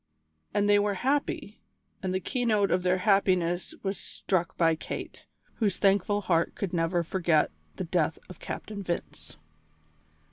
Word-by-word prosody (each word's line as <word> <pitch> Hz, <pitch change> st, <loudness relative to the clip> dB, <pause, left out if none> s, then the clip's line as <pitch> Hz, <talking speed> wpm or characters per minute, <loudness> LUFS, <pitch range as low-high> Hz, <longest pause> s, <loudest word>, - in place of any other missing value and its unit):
And 205 Hz, 0 st, +2 dB
they 205 Hz, 0 st, +6 dB
were 205 Hz, -1 st, +1 dB
happy, 260 Hz, -3 st, -1 dB, 0.4 s
and 190 Hz, -2 st, -2 dB
the 185 Hz, -, 0 dB
keynote 215 Hz, -1 st, +1 dB
of 180 Hz, -, +3 dB
their 180 Hz, +1 st, +2 dB
happiness 185 Hz, -3 st, +2 dB
was 195 Hz, -1 st, -2 dB
struck 175 Hz, -3 st, -2 dB
by 165 Hz, -1 st, +4 dB
Kate, 160 Hz, -, -6 dB, 0.3 s
whose 205 Hz, -5 st, +1 dB
thankful 200 Hz, +1 st, +3 dB
heart 170 Hz, -4 st, +1 dB
could 195 Hz, -3 st, -3 dB
never 170 Hz, 0 st, +1 dB
forget 170 Hz, -3 st, +2 dB, 0.2 s
the 185 Hz, -, -3 dB
death 165 Hz, -2 st, 0 dB
of 185 Hz, -, -11 dB
Captain 210 Hz, -2 st, -6 dB
Vince. 175 Hz, -, -5 dB
185 Hz, 145 wpm, -28 LUFS, 175-205 Hz, 0.4 s, they